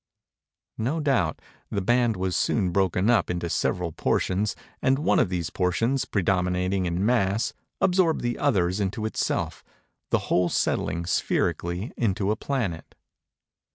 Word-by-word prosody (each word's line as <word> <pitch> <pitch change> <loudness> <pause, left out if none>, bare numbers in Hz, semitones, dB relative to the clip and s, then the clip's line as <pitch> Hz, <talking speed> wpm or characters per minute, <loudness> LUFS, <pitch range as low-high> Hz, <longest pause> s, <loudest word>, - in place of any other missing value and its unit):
No 130 +9 0
doubt, 130 - +1 0.3
the 100 - -1
band 120 +3 +2
was 95 0 -1
soon 95 -6 +1
broken 95 +1 +1
up 115 -5 +3
into 85 -1 -2
several 90 -2 0
portions, 95 +5 0 0.3
and 130 +1 +3
one 150 - +2
of 110 - +2
these 85 -4 -2
portions, 115 +9 0
predominating 90 -1 0
in 85 +3 -1
mass, 110 -2 +1 0.3
absorbed 180 -3 +3
the 120 0 -2
others 95 -9 +1
into 105 +2 -2
itself; 110 - -2 0.5
the - - +3
whole 90 -1 +3
settling, 85 0 0
spherically, 90 +3 -1
into 100 -3 +1
a - - +1
planet. 110 - -3
95 Hz, 135 wpm, -26 LUFS, 90-120 Hz, 0.5 s, up